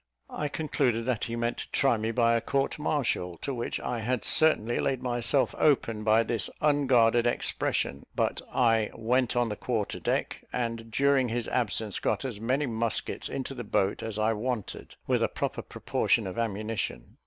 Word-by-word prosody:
I 150 - -2
concluded 135 -5 -1
that 125 -4 -1
he 115 - -4
meant 120 0 -1
to - - -6
try 135 -3 +3
me 110 0 -2
by 115 0 +3
a 115 - +1
court 140 +4 -1
martial, 120 - -1
to 140 - -4
which 120 -2 -3
I 120 - -3
had 125 +2 -1
certainly 120 -7 +4
laid 130 -2 -1
myself 120 +2 +2
open 115 -7 +2
by 110 +1 +4
this 110 -4 0
unguarded 125 -6 +3
expression; 70 - -1
but - - 0
I 115 -3 +2
went 125 +2 +1
on 120 -1 +2
the 105 - -3
quarter 110 -2 -2
deck, - - -2
and, 115 -2 -3
during 135 +1 +2
his 120 0 -2
absence, 110 -3 -1
got - - -1
as 115 -6 -4
many 130 +6 +1
muskets 115 -2 -1
into 135 0 -4
the 125 -2 -6
boat 100 -2 0
as 110 -2 -4
I 110 +1 +2
wanted, 110 0 -4
with - - +1
a - - +3
proper - - -3
proportion - - 0
of 95 - -5
ammunition. 110 0 -3
120 Hz, 175 wpm, -28 LUFS, 110-130 Hz, -, certainly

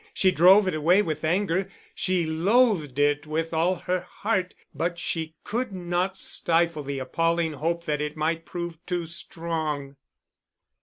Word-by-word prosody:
She 190 - +4
drove 185 +4 +6
it 185 - 0
away 170 +6 +4
with 155 -4 -3
anger, 185 +2 +1 0.2
she 185 -2 0
loathed 170 - +2
it 145 +1 +2
with 160 +2 -2
all 170 +3 +2
her 180 +1 -1
heart 185 0 -2 0.2
but 170 +1 -2
she 160 -2 -3
could 240 +1 -2
not 180 +1 -1
stifle 170 -3 +1
the 140 -1 -4
appalling 165 +4 0
hope 170 +4 -2
that 150 -3 -1
it 150 +1 -4
might 160 +2 0
prove 170 -1 -6
too 175 -2 -1
strong. 160 -4 -4
170 Hz, 150 wpm, -26 LUFS, 155-180 Hz, 0.2 s, drove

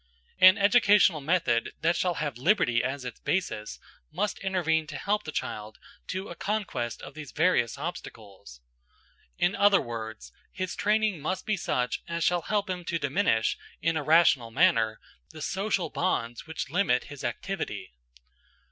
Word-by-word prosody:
An 185 +2 +8
educational 200 -6 +5
method 140 -7 +1
that 170 +2 +2
shall 180 -2 0
have 145 -6 -3
liberty 155 - +2
as 130 0 -3
its 125 - -7
basis 110 - -2 0.3
must 210 - -2
intervene 165 -5 0
to 155 - -6
help 210 +1 -1
the 155 - -5
child 110 -6 -5 0.3
to 190 +2 -4
a - - -7
conquest 200 - -3
of - - -9
these 155 -2 -9
various 160 -8 +2
obstacles. 100 - -8 0.8
In 175 +3 +1
other 200 -1 +5
words, 110 - -6 0.2
his 185 -1 -4
training 215 -3 +1
must 185 +5 -3
be 215 - +1
such 125 - -1
as 170 0 -2
shall 175 +1 +2
help 205 +3 -1
him 180 -1 -4
to 170 - -1
diminish, 130 -6 +1 0.2
in 165 0 0
a 155 - 0
rational 150 -6 +4
manner, 115 -7 +2 0.3
the 160 - -11
social 190 +1 -1
bonds, 120 -8 -2
which 160 -4 -5
limit 165 -8 +2
his 145 -2 -10
activity. - - -4
165 Hz, 155 wpm, -28 LUFS, 125-190 Hz, 0.8 s, An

